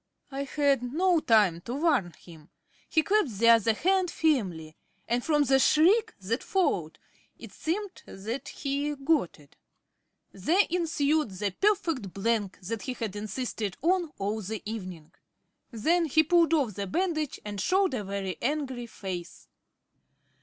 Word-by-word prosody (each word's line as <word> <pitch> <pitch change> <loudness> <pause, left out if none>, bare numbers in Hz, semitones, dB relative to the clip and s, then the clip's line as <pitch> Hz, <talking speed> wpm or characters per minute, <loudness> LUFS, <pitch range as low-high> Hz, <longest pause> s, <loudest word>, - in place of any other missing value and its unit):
I 275 +1 -3
had 280 -1 +1
no 335 +8 +2
time 210 - +3
to 245 - -4
warn 280 - +1
him. 160 -1 -16 0.4
He 315 - +3
clasped 385 - +1
the 230 +3 +4
other 230 -1 +5
hand 375 - +2
firmly; 185 - -1 0.3
and 240 +1 0
from 300 -2 +3
the 270 -1 +3
shriek 355 - +4
that 225 +7 -2
followed 190 - 0 0.4
it - - -11
seemed 380 +4 -4
that 220 +7 -6
he 285 +1 -2
got 275 - 0
it. 145 -1 -21 0.7
There 330 - +2
ensued 310 -4 +1
the 195 +1 -3
"perfect 325 - 0
blank" 205 -1 -1
that 210 +4 -4
he 255 - -4
had 225 -5 -5
insisted 215 -1 -4
on 350 -1 +2
all 205 +3 -2
the 215 +2 -5
evening. 185 -8 -7 0.6
Then 330 +9 +1
he 315 +1 +3
pulled 335 0 +4
off 265 -9 0
the 200 +1 -4
bandage, 310 - -1
and 205 -2 -4
showed 380 - +2
a 225 -5 -2
very 195 -3 -4
angry 260 -3 -2
face. 185 -5 -7
250 Hz, 145 wpm, -28 LUFS, 200-315 Hz, 0.7 s, other